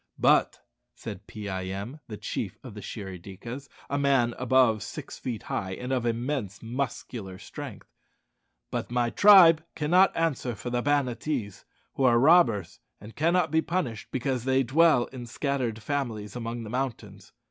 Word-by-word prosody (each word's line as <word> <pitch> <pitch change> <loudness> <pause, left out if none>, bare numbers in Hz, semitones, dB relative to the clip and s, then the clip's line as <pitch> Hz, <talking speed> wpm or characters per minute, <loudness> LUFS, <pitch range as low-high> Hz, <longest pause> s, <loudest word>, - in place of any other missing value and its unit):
"But," - - +3 0.3
said - - -8
Pee 105 -1 -7
eye 95 -1 -3
em, 100 +10 -5
the 105 - -7
chief - - -4
of - - -9
the - - -8
Shirry 95 -3 -7
dikas, 120 +9 -8 0.2
a 140 - -1
man 135 -4 +3
above 125 -4 +3
six - - -7
feet 120 -4 -4
high, 95 -1 -3
and 125 +6 -4
of 120 -2 0
immense 115 -4 -2
muscular 115 -5 -4
strength - - -9 0.8
"but - - -3
my 120 -1 0
tribe 175 -6 +8
cannot 180 +5 +4
answer 145 -7 0
for 120 +4 -6
the 120 0 0
Banattees, 125 -6 -1 0.3
who 135 - -1
are 120 -2 +5
robbers, 120 - +4 0.2
and 105 +2 -12
cannot 165 +1 +2
be 160 0 +3
punished, 130 -12 -3
because 130 -1 -2
they 130 +1 +2
dwell 150 0 +4
in 120 -2 -7
scattered 120 -4 -2
families 115 -6 -3
among 115 0 -4
the 105 - -8
mountains. 130 -1 -4
125 Hz, 160 wpm, -27 LUFS, 110-140 Hz, 0.8 s, tribe